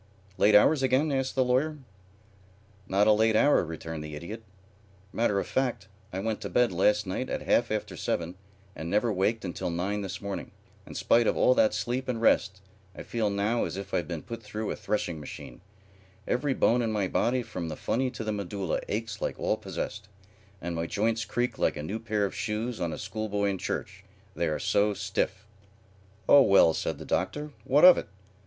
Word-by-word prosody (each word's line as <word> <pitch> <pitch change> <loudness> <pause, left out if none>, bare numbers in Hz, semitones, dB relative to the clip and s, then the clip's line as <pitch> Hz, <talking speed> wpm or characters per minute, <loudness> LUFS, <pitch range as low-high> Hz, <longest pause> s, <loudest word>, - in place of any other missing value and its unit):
"Late 105 0 +5
hours 135 +8 +6
again?" 135 +4 +2
asked 135 -1 -1
the 130 - +3
Lawyer. 140 +5 +1 1.1
"Not 100 +2 +3
a 110 - +6
late 110 +1 +3
hour," 145 +1 +4
returned 80 -1 -6
the 75 -1 -7
Idiot. 85 +9 -7 0.7
"Matter 110 -3 +1
of - - -2
fact, 120 -7 -2 0.2
I 95 - -5
went 110 +2 -2
to - - -4
bed 125 -3 +3
last 105 +4 +2
night 95 +7 -3
at - - -3
half 120 - +2
after 110 -1 -3
seven 85 +1 -2 0.4
and 80 - -5
never 105 +4 +1
waked 105 +3 0
until 90 -1 -3
nine 95 +5 -2
this 95 -1 -5
morning. 100 -1 -5 0.4
In - - -10
spite 115 -1 +3
of - - +1
all 125 - +5
that 110 -4 +3
sleep 125 +2 -2
and 120 -3 -1
rest 100 -4 +2 0.3
I - - -7
feel 110 -3 -1
now 100 +4 0
as 85 +2 -5
if 100 0 -7
I'd 85 - 0
been 85 -3 -5
put 115 -1 -7
through 105 0 -4
a - - -3
threshing 90 -6 -2
machine. 75 - -9 0.7
Every 135 +2 0
bone 120 +2 +3
in 115 -2 0
my 105 -3 0
body 125 +6 +1
from 85 -7 -5
the 80 - -4
funny 130 +9 -1
to 120 -2 -6
the 110 - -2
medulla 100 -3 -2
aches 110 0 -4
like - - -2
all - - 0
possessed, 105 0 -6 0.5
and 85 -1 -4
my 85 0 -2
joints 110 +3 0
creak 120 +5 -2
like - - +1
a 75 - -5
new 100 +8 -4
pair 105 -2 0
of 100 - -4
shoes 110 +2 -3
on 85 -1 -1
a - - -5
school 110 +2 -4
boy 100 0 0
in 95 - -4
church, 95 +2 -4 0.3
they 85 - 0
are 75 - -1
so 105 0 +1
stiff." 95 +1 -2 0.8
"Oh 145 - +8
well," 100 -8 +6
said - - -2
the - - -9
Doctor, 150 0 -2
"what 145 +6 +5
of 180 - +9
it? - - -7
105 Hz, 200 wpm, -28 LUFS, 95-120 Hz, 1.1 s, of